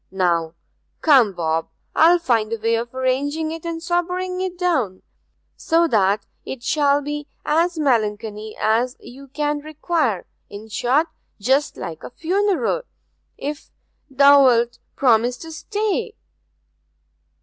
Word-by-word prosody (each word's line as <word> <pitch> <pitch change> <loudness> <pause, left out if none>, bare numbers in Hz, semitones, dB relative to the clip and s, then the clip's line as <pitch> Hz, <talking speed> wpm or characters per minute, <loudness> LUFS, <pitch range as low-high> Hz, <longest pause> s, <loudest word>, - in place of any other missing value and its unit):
Now, 170 -3 0 0.5
come, 265 -9 +5
Bob, 165 -2 -1 0.3
I'll 335 +3 +6
find 230 -10 0
a 230 - -1
way 225 +1 0
of 230 +1 -1
arranging 285 +5 -1
it 330 +1 -6
and 330 -1 -4
sobering 360 +1 -1
it 370 -1 -3
down, 265 - 0 0.5
so 335 +1 +2
that 200 -2 +2 0.2
it 250 -3 -7
shall 290 0 +2
be 295 +1 -4 0.2
as 330 +3 +1
melancholy 215 -5 -1
as 235 +4 +1
you 275 +3 -12
can 295 +2 -2
require 300 - -1 0.2
in 210 +2 -10
short, 255 +8 +2 0.3
just 265 +7 +1
like 160 -1 -7
a - - -7
funeral, 395 - 0 0.6
if 295 +2 -6 0.4
thou'lt 265 -4 +5 0.2
promise 245 -1 +3
to 325 - -9
stay?' 415 +6 -2
275 Hz, 125 wpm, -21 LUFS, 225-325 Hz, 0.6 s, I'll